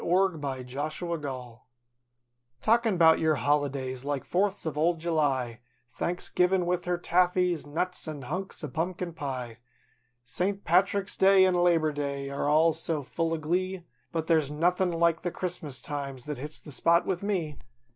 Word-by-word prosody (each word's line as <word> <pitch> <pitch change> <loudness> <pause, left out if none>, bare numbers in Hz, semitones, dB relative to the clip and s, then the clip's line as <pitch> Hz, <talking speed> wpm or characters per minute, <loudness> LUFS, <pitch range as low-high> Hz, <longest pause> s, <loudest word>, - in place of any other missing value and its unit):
THE - - -5
CHRISTMAS 150 -6 -1
SPIRIT 135 -9 -5 1.0
Talkin' 225 -3 +3
'bout 160 -1 +6
yer 160 -1 +3
holidays 140 -3 -1
like 140 -1 -2
Fourth's 195 +1 0
of 155 -3 -2
old 165 +3 +2
July; 140 -8 0 0.4
Thanksgivin' 180 +1 +1
with 180 0 -1
her 175 0 0
taffies, 180 -2 +1
nuts 180 +4 -2
an' 150 -3 -6
hunks 180 +7 -5
of 145 -4 -5
pumpkin 175 +2 -2
pie; 130 -6 -5 0.6
Saint 190 +11 -2
Patrick's 195 +3 +2
Day 190 0 +6
an' 185 - +3
Labor 170 -3 +3
Day 140 -1 -3
an' 140 - -5
all 155 +3 +4
so 160 -2 -2
full 165 +5 -2
of 165 -1 -2
glee. 180 +3 -1 0.3
But 165 -1 -2
there's 160 -4 +2
nothin' 180 +5 +1
like 170 -1 +2
the 175 - -1
Christmas 170 -6 -4
times 140 -3 -4
that 150 -4 -5
hits 150 +3 -5
the 150 - -11
spot 170 +5 +3
with 180 -2 -1
me. 180 -8 -2
165 Hz, 155 wpm, -28 LUFS, 145-180 Hz, 1.0 s, bout